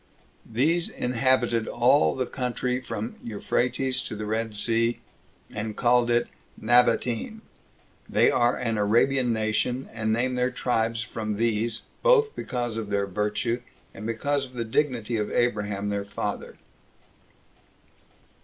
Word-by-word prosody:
These 160 +9 +2
inhabited 125 -2 +1
all 80 0 +3
the 130 - -1
country 125 0 -2
from 115 -2 -5
Euphrates 125 +4 -1
to - - -6
the 105 0 -5
Red 110 0 -2
Sea, 115 +2 +1 0.5
and 105 0 -4
called 120 0 +3
it 120 0 +2 0.3
Nabatene. 120 - +2 0.7
They - - +4
are 120 +1 +2
an 115 -3 -1
Arabian 120 +4 +3
nation, 110 +4 0
and 110 -1 -1
name 125 +3 +1
their 125 0 +1
tribes 115 -2 -1
from 110 -2 -4
these, 115 0 0 0.2
both 455 -3 +4
because 120 -3 -3
of 110 -2 -4
their 100 -1 +1
own 100 - -13
virtue, 105 +4 -1 0.3
and 105 +2 -7
because 140 +5 0
of 130 -2 -9
the 120 -2 -3
dignity 120 -2 0
of 105 -1 -1
Abraham 105 -4 0
their 100 -1 -2
father. 100 - -5
115 Hz, 135 wpm, -26 LUFS, 110-125 Hz, 0.7 s, They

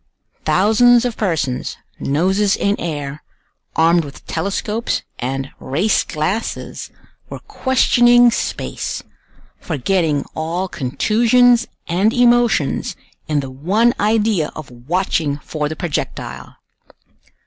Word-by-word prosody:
Thousands 225 +8 +4
of 240 -2 -2
persons, 160 - -2 0.2
noses 190 +8 +1
in 200 +1 +1
air, 150 -3 -4 0.5
armed 165 +1 +4
with 145 -1 -11
telescopes 210 +3 -2 0.2
and 135 +2 -3
race 165 +11 +1
glasses, 170 +9 -3 0.4
were - - -6
questioning 245 -2 +4
space, - - -3 0.6
forgetting 160 -1 0
all 170 +4 -2
contusions 235 - +3 0.2
and 195 +6 +2
emotions 240 - +2 0.3
in 150 -2 +1
the 135 -1 -7
one 200 - +2
idea 210 -6 +1
of 155 -4 -9
watching 145 +3 -1
for 150 0 -4
the 160 - -5
projectile. 170 -3 -5
180 Hz, 100 wpm, -18 LUFS, 150-225 Hz, 0.6 s, Thousands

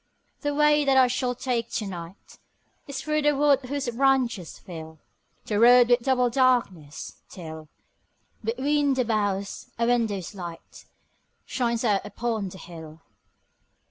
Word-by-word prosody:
The 290 -1 -2
way 300 0 +4
that 270 -1 +3
I 260 - +7
shall 250 0 -1
take 240 -2 -2
to 215 - -1
night 175 -1 -9 0.5
Is 270 -1 -5
through 305 0 0
the 295 0 +3
wood 285 -1 +4
whose 280 +1 -3
branches 245 - +1
fill 160 -2 -10 0.5
The 210 -1 -1
road 245 +1 +7
with 245 - +6
double 250 -1 +2
darkness, 230 - 0
till, 160 -3 -9 0.7
Between 275 +5 +1
the 255 -1 +1
boughs, 205 -3 -2
a 235 - +1
window's 220 -6 0
light 175 -4 -9 0.6
Shines 235 -2 -1
out 200 -2 +2
upon 225 -5 -3
the 190 - -11
hill. 160 -3 -11
235 Hz, 140 wpm, -25 LUFS, 190-265 Hz, 0.7 s, I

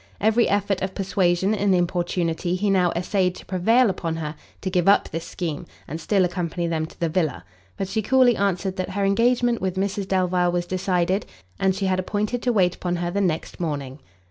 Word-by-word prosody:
Every 220 +2 +3
effort 200 -1 0
of 190 0 -3
persuasion 190 0 +1
and 200 -2 +2
importunity 175 0 0
he 200 +2 0
now 180 -3 +3
essayed 180 +1 0
to - - -12
prevail 225 +7 +3
upon 170 -4 -2
her 155 -2 -4 0.3
to 190 - -2
give 180 -1 +1
up 200 - +4
this 165 0 -5
scheme, 165 -5 -4 0.2
and 160 +4 -6
still 195 +1 +2
accompany 175 -1 -2
them 160 -1 -1
to - - -18
the 170 - +1
villa; 160 - -1 0.3
but 195 - -2
she 220 +3 -1
coolly 250 +2 +4
answered 195 -1 -1
that 185 - -2
her 200 +1 -1
engagement 235 +3 +2
with 190 -1 -1
Mrs 195 0 -2
Delvile 180 -2 +1
was 175 0 -1
decided, 185 +1 0 0.3
and 190 -1 +2
she 195 0 -2
had 185 -1 +1
appointed 210 +5 -2
to 245 - +1
wait 185 -6 +3
upon 175 -1 -3
her 175 0 -2
the 200 +2 0
next 170 -5 -2
morning. 145 -5 -4
185 Hz, 200 wpm, -23 LUFS, 175-200 Hz, 0.3 s, up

